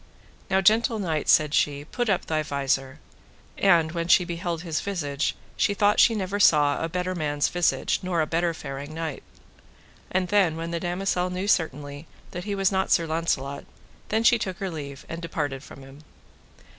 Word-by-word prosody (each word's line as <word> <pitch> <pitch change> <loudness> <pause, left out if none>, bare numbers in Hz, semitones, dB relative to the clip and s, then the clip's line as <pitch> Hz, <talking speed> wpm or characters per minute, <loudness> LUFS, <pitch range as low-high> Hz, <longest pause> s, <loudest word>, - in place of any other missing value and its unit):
Now, 190 0 +3
gentle 225 +4 +3
knight, 165 -7 -2
said 150 -1 +4
she, 145 -1 +1
put 240 +7 -2
up 190 - +1
thy 155 -1 0
visor; 135 -2 -1 0.6
and 170 -5 +3
when 170 0 -3
she 180 0 +5
beheld 170 -1 -4
his 165 -3 -2
visage 155 -8 -2 0.2
she 205 - +1
thought 205 +1 +3
she 230 - +6
saw - - -2 0.6
never - - -3
a 165 - -2
better 180 +2 -2
man's 145 -4 0
visage, 175 -1 +1
nor 180 -2 -1
a 155 - +2
better 170 +2 0
faring 140 +1 -7
knight. 160 -3 -4 0.9
And 185 -1 -1
then 195 -6 +3
when 165 +1 -5
the 170 - -2
damosel 180 +1 -1
knew 185 +2 -3
certainly 145 -4 -1 0.2
that 180 0 -6
he 205 -1 -2
was 195 0 +2
not 190 0 0
Sir 170 - +3
Launcelot, 150 -4 -2 0.4
then 220 +1 +1
she 235 0 +5
took 190 -4 -4
her 195 -2 -4
leave, 140 -3 -7
and 165 +1 -6
departed 145 -5 -3
from 135 -1 -12
him. 135 +1 -14
170 Hz, 180 wpm, -25 LUFS, 150-185 Hz, 0.9 s, she